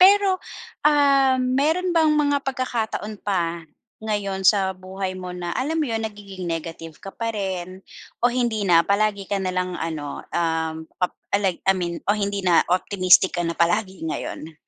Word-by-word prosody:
Pero, 390 0 +6 0.5
um, 275 -3 +4 0.2
meron 325 +6 +1
bang 320 -2 +4
mga 285 -2 +2
pagkakataon 235 -5 -3
pa 170 -4 -1 0.4
ngayon 200 -3 -2
sa 190 -1 +4
buhay 185 0 -5
mo 180 -1 -6
na 175 -1 -4
alam 310 +5 -1
mo 300 - +1
'yon 225 -1 -1
nagiging 200 -3 -7
negative 165 -1 -6
ka - - -9
pa 230 0 -2
rin 185 -3 -4 0.4
o 245 - +4
hindi 240 -4 0
na? 170 -1 +6
Palagi 200 +1 +1
ka 200 - +1
na 185 -1 -2
lang 185 -1 -2
ano, 155 -3 -4
um, 160 -1 -1 0.2
pap 180 - 0 0.2
alay 195 -3 +1
I 195 - +6
mean 175 -2 -3
o - - +4
hindi 200 -1 -2
na 175 -2 +5
optimistic 185 0 +4
ka - - +1
na 170 - -2
palagi 185 +2 +1
ngayon? 160 0 -5
195 Hz, 170 wpm, -23 LUFS, 180-235 Hz, 0.5 s, Pero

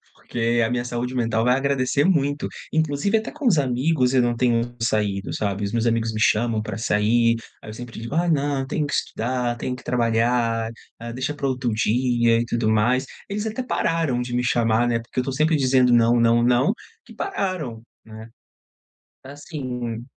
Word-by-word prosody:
Porque 120 0 -1
a - - -1
minha 120 -1 0
saúde 125 +1 -4
mental 115 -2 0
vai 125 - +4
agradecer 135 0 +1
muito. 145 -5 +1 0.3
Inclusive 160 +7 +1
até 220 - -7
com 295 -2 -8
os 190 -9 +4
amigos 130 0 +1
eu 130 - +4
não 120 0 +1
tenho 120 0 0
saído, 105 -3 0
sabe? 100 -1 -2
Os 100 - -2
meus 115 0 0
amigos 115 -1 +1
me 110 - -4
chamam 110 +1 +2
para 110 -2 -5
sair, 115 +2 +2 0.3
aí - - -10
eu 110 - -7
sempre 120 0 -8
digo: 115 +6 -5
"Ai, 170 +1 +2
não, 140 -3 0
tenho 145 +2 -2
que - - -5
estudar, 120 +1 -1
tenho 125 +2 -3
que 125 - -13
trabalhar, 115 -1 +1 0.3
ah, 115 0 -6
deixa 130 +4 -3
para 140 - -2
outro 130 -2 -1
dia." 120 +1 +2
E 120 - -1
tudo 120 -2 0
mais. 120 +5 +2 0.2
Eles 205 +2 -3
até 220 +3 -3
pararam 165 - 0
de 120 0 -4
me 125 - +1
chamar, 120 -1 +2
né? 115 -1 +1
Porque 115 +2 -5
eu - - +3
estou 135 +1 -4
sempre 155 +4 +2
dizendo: 130 -3 +3
"Não, 120 0 +4
não, 115 0 +4
não." 125 - +3 0.3
Que - - -14
pararam, 180 - -3 0.2
né? 110 0 -11 1.0
Assim 130 -5 -6
120 Hz, 190 wpm, -23 LUFS, 115-135 Hz, 1.0 s, vai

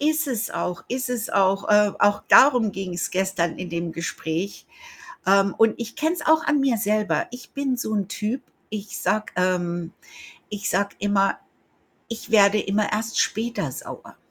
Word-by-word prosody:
Ist 310 +1 +1
es 235 -5 -2
auch 180 -1 -4
ist 255 +1 -2
es 245 -3 -3
auch. 195 +1 +2
Ähm, 210 -1 +4
auch 205 0 +3
darum 250 -6 +6
ging's 185 -2 -4
gestern 185 -3 -1
in 180 - -6
dem 170 0 -3
Gespräch. 165 +3 -4 0.6
Ähm, 195 0 +3
und 225 -1 +4
ich 235 -1 -6
kenne 315 +2 0
es - - -6
auch 315 0 +4
an 295 - +2
mir 270 -4 +2
selber. 210 +1 0
Ich 245 0 -11
bin 275 -2 -1
so 220 -2 -3
'n 200 -3 -1
Typ, 220 +6 -3 0.3
ich 210 -1 -6
sage 215 0 -1
ähm, 175 -1 -1 0.6
ich 205 -1 -4
sage 200 +2 0
immer: 195 -1 +1 0.7
„Ich 230 0 -7
werde 210 -1 +5
immer 205 +2 0
erst 220 +2 -2
später 220 - -1
sauer.“ - - -9
205 Hz, 170 wpm, -23 LUFS, 190-235 Hz, 0.7 s, darum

